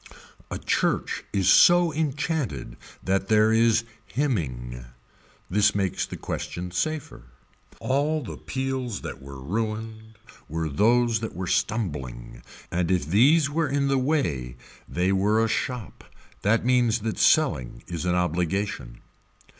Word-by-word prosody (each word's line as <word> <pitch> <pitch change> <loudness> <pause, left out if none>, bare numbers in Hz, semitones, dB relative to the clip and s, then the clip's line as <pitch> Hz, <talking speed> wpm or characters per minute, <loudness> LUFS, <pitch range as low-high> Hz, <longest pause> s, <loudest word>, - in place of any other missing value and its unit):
A - - -3
church - - 0
is 95 -3 0
so 175 -2 +6
enchanted 145 - -2 0.3
that 95 +1 0
there 110 +1 +4
is 115 0 +3 0.2
hymning. 65 - -2 0.6
This 105 +2 +3
makes 95 -3 -1
the - - -7
question 90 +1 -5
safer. 140 - -3 0.5
All 145 +3 0
the 115 - -7
peals 130 -5 -3
that - - -7
were 70 0 -10
ruined 110 +6 -4 0.3
were 80 0 -2
those 115 - +3
that 110 -4 -5
were 95 +1 -3
stumbling 75 - -2 0.3
and 85 -1 0
if 90 -4 +1
these 135 - +4
were 155 +2 -1
in 140 0 +1
the 135 -1 +2
way 85 - -1 0.3
they 90 +3 +1
were 100 +3 +2
a 115 - +3
shop. 125 -1 -3 0.4
That 110 +3 +2
means 120 -3 +3
that 110 0 -3
selling 105 - +2
is 85 -2 -5
an 90 -1 +1
obligation. 90 -6 -2
110 Hz, 130 wpm, -25 LUFS, 85-130 Hz, 0.6 s, so